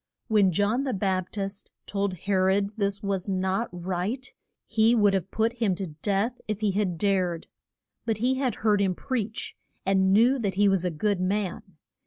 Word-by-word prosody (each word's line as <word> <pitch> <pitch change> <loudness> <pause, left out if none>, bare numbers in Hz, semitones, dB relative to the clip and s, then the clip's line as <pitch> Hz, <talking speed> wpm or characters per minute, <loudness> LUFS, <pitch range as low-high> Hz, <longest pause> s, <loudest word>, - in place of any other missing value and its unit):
When 205 -4 +4
John 205 +8 +1
the 260 -5 -1
Bap 185 -2 -1
tist 195 -1 -5 0.2
told 200 -2 -1
He 195 +4 -3
rod 190 +2 +2
this 200 -2 -1
was 195 -1 -1
not 190 +4 0
right, 185 +9 -3 0.3
he 225 +1 +3
would 205 -3 +4
have 195 0 -1
put 225 +3 0
him 225 -6 0
to 190 +1 -4
death 210 +5 0
if 215 -1 -3
he 210 -2 +2
had 190 -3 -1
dared. 185 -3 0 0.6
But 225 -2 +1
he 245 +4 +2
had 260 -2 -1
heard 210 -2 +4
him 190 -2 +1
preach, 225 -4 -3 0.3
and 190 0 +3
knew 240 +7 +5
that 200 -5 -1
he 205 +1 +4
was 195 -2 +2
a 180 - +1
good 195 +4 0
man. 190 -2 -2
200 Hz, 185 wpm, -26 LUFS, 190-220 Hz, 0.6 s, knew